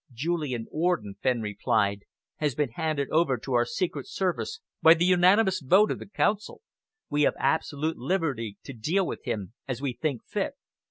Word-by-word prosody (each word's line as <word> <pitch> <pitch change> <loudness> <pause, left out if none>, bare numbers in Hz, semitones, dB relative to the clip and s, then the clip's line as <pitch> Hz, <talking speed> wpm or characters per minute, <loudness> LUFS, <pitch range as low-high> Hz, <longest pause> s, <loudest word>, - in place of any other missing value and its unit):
"Julian 135 -3 -2
Orden," 155 - 0
Fenn 125 -3 +1
replied, 100 -1 0 0.3
"has 150 -5 -1
been 150 -4 0
handed 150 +1 -1
over 155 -5 +3
to 130 +3 -5
our 120 0 +4
secret 140 +3 -3
service 190 - -2 0.2
by 160 0 +8
the 170 +1 +1
unanimous 185 +2 +4
vote 190 +10 +5
of - - -3
the - - -10
Council. 210 - -1 0.5
We 145 - +1
have 145 - +3
absolute 155 +2 0
liberty 135 - -2
to 135 - -8
deal 165 - 0
with - - -5
him 105 -5 -3
as 130 -3 -3
we 135 -2 -2
think 140 -2 -3
fit." - - -2
145 Hz, 170 wpm, -27 LUFS, 120-175 Hz, 0.5 s, by